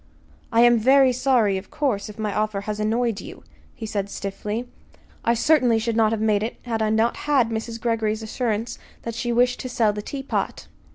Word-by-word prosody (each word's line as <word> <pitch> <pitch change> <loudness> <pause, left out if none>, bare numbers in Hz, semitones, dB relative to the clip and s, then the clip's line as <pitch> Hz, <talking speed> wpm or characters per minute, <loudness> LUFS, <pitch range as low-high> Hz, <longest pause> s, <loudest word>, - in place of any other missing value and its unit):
"I 230 0 +4
am 240 -1 +6
very 265 +2 +5
sorry, 240 -6 +2
of 190 - -15
course, 260 -10 -1
if 210 - -11
my 215 -2 -2
offer 215 -1 -1
has 210 +1 -4
annoyed 225 0 0
you," - - -11 0.3
he 225 - -6
said 200 -2 -3
stiffly. 210 +5 -4 0.6
"I 235 - +2
certainly 250 -2 +3
should 225 0 -1
not 220 -1 +3
have 225 - -1
made 215 -2 +2
it 220 +2 -3
had 230 -2 -2
I 215 - +1
not 220 +2 +2
had 260 -6 +4
Mrs. 225 +1 -4
Greggory's 225 -2 -1
assurance 225 0 -2 0.2
that 230 - -4
she 240 +1 -2
wished 245 +1 +2
to 255 - -5
sell 225 -4 +2
the 210 - -4
teapot." 270 +5 -4
225 Hz, 195 wpm, -23 LUFS, 215-240 Hz, 0.6 s, am